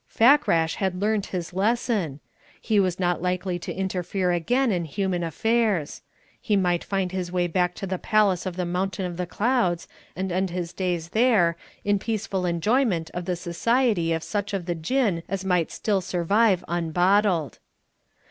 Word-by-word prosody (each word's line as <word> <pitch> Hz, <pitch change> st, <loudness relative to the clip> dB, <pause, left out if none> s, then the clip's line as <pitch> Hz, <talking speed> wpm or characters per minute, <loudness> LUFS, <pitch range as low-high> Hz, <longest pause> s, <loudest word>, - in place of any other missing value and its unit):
Fakrash 225 Hz, -, +3 dB
had 190 Hz, -2 st, -1 dB
learnt 210 Hz, 0 st, 0 dB
his 175 Hz, -2 st, -5 dB
lesson: 200 Hz, -, 0 dB, 0.4 s
he 215 Hz, -2 st, +1 dB
was 185 Hz, -2 st, +1 dB
not 175 Hz, -2 st, 0 dB
likely 180 Hz, 0 st, -1 dB
to 170 Hz, -, -6 dB
interfere 185 Hz, 0 st, -1 dB
again 245 Hz, +9 st, +1 dB
in 175 Hz, -3 st, 0 dB
human 180 Hz, +3 st, -2 dB
affairs; 210 Hz, -1 st, 0 dB, 0.4 s
he 210 Hz, -, +1 dB
might 180 Hz, -3 st, +1 dB
find 195 Hz, -2 st, -1 dB
his 185 Hz, -2 st, -3 dB
way 180 Hz, -1 st, +1 dB
back 180 Hz, +1 st, 0 dB
to 200 Hz, -, -5 dB
the 185 Hz, -1 st, -3 dB
Palace 200 Hz, -4 st, +2 dB
of 180 Hz, -, -4 dB
the 180 Hz, -1 st, -2 dB
Mountain 185 Hz, +2 st, -2 dB
of 175 Hz, -1 st, -4 dB
the 180 Hz, -1 st, -3 dB
Clouds 205 Hz, -6 st, 0 dB, 0.3 s
and 190 Hz, 0 st, -3 dB
end 185 Hz, +2 st, 0 dB
his 175 Hz, -1 st, -4 dB
days 175 Hz, -3 st, -2 dB
there, 215 Hz, -7 st, +3 dB, 0.3 s
in 205 Hz, -1 st, +2 dB
peaceful 195 Hz, -4 st, -2 dB
enjoyment 175 Hz, 0 st, +1 dB
of 175 Hz, 0 st, -4 dB
the 180 Hz, -1 st, -1 dB
society 180 Hz, +1 st, +1 dB
of 165 Hz, -1 st, -1 dB
such 205 Hz, -1 st, -2 dB
of 185 Hz, -3 st, -3 dB
the 175 Hz, -, -1 dB
Jinn 180 Hz, +2 st, 0 dB
as 190 Hz, 0 st, -3 dB
might 180 Hz, -4 st, +1 dB
still 200 Hz, -3 st, 0 dB
survive 190 Hz, +3 st, +2 dB
unbottled. 175 Hz, 0 st, +1 dB
185 Hz, 165 wpm, -25 LUFS, 175-205 Hz, 0.4 s, Fakrash